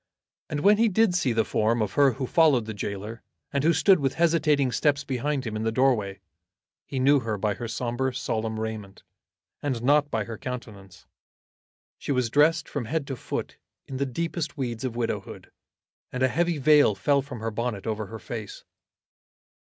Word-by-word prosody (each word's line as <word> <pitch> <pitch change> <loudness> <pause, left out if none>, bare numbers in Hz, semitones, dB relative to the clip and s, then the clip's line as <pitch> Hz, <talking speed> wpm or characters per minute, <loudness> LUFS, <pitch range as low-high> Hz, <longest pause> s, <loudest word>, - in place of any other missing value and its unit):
And 145 -1 -2
when 205 +4 +5
he 230 +1 +4
did 215 -1 +3
see 160 -8 +1
the 110 -1 +1
form 110 +2 +1
of 105 -3 -1
her 140 -3 +4
who 130 +2 -3
followed 140 -5 +3
the 110 - -5
gaoler, 105 +2 -5 0.3
and 140 0 0
who 165 - +5
stood 185 +3 +4
with 135 -2 -1
hesitating 155 -5 +2
steps 145 +4 +1
behind 140 0 -2
him 110 -2 -4
in 110 - -2
the 110 0 0
doorway, 110 -6 +1 0.7
he 135 - -5
knew 140 +2 +5
her 110 -4 -3
by 105 +1 0
her 115 +4 -6
sombre 120 +3 -2
solemn 110 -2 -2
raiment, 110 -3 -6 0.6
and 130 -5 -2
not 145 +2 +3
by 110 -6 -1
her 115 0 -8
countenance. 110 -7 -8 0.9
She - - -4
was 125 -4 0
dressed 150 +4 +3
from 140 -5 -4
head 150 +4 -2
to 135 - -4
foot - - -5 0.3
in 135 - -6
the 140 +1 -1
deepest 165 +4 -3
weeds 120 -4 -3
of 125 -3 -3
widowhood, 120 -1 -4 0.6
and 130 0 -2
a 130 - +4
heavy 170 +4 0
veil 145 -6 +5
fell 140 +8 +2
from 135 -3 -8
her 115 0 -2
bonnet 115 -2 -3
over 110 -2 -3
her 110 - -7
face. 110 -2 -7
125 Hz, 185 wpm, -26 LUFS, 110-145 Hz, 0.9 s, when